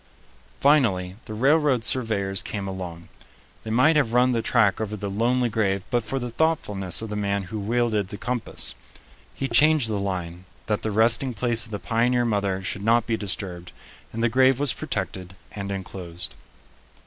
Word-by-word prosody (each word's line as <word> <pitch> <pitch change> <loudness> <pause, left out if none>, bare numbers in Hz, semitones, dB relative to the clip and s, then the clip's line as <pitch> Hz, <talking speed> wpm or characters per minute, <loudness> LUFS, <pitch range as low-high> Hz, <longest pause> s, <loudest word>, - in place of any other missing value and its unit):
Finally 105 -11 +3
the 110 - -7
railroad 140 0 +3
surveyors 105 -6 +1
came 100 -2 -4
along. 90 -3 -7 0.5
They 110 - -8
might 130 +8 +4
have 130 -7 +2
run 125 +1 +4
the 115 -2 0
track 110 -3 +2
over 105 0 -3
the 100 -1 -4
lonely 120 +4 +1
grave 100 -4 0
but 120 -1 +2
for 135 - -3
the 120 -2 -4
thoughtfulness 110 - 0
of 110 - -5
the 105 - -4
man 100 -1 -1
who 105 +4 -6
wielded 110 -1 0
the 100 - -7
compass. 120 - -1 0.6
He 135 - -2
changed 155 -4 +4
the 105 -2 -1
line, 90 -2 -4 0.2
that 105 -1 -1
the 110 - -2
resting 115 +4 +3
place 120 0 0
of 115 - -13
the 105 - -2
pioneer 115 +6 +1
mother 100 -4 -1
should 100 +1 -3
not 115 +1 +3
be 115 - 0
disturbed, 90 -4 -4 0.4
and 115 +1 -3
the - - +5
grave 130 +2 +4
was 140 -4 +2
protected 95 -4 -4 0.2
and 100 -1 -5
enclosed. 90 -3 -5
110 Hz, 175 wpm, -24 LUFS, 100-120 Hz, 0.6 s, the